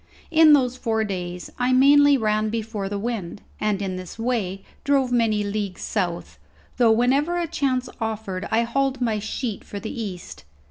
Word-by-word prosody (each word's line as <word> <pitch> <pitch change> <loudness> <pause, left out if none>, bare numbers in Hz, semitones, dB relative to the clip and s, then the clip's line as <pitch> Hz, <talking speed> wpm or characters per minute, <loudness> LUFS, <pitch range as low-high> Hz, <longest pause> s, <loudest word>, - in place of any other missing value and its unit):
In 315 -2 +7
those 255 -3 +3
four 225 -3 0
days 180 -3 -5
I 250 +1 +2
mainly 285 +2 +6
ran 215 -2 +1
before 215 -3 -3
the 205 - -3
wind, 205 -4 -4 0.2
and 205 -2 0
in 185 -1 -3
this 185 -1 -8
way 220 -5 -2 0.2
drove 275 -3 +2
many 225 -4 +2
leagues 205 -2 -3
south, 175 -5 -3 0.4
though 240 -2 +5
whenever 270 +9 +2
a 345 - 0
chance 270 -6 -1
offered 220 -4 -3
I 225 +1 +2
hauled 270 +2 0
my 225 -4 0
sheet 215 +1 -4
for 205 - -7
the 220 - -6
east. 195 -7 -7
225 Hz, 170 wpm, -23 LUFS, 200-255 Hz, 0.4 s, In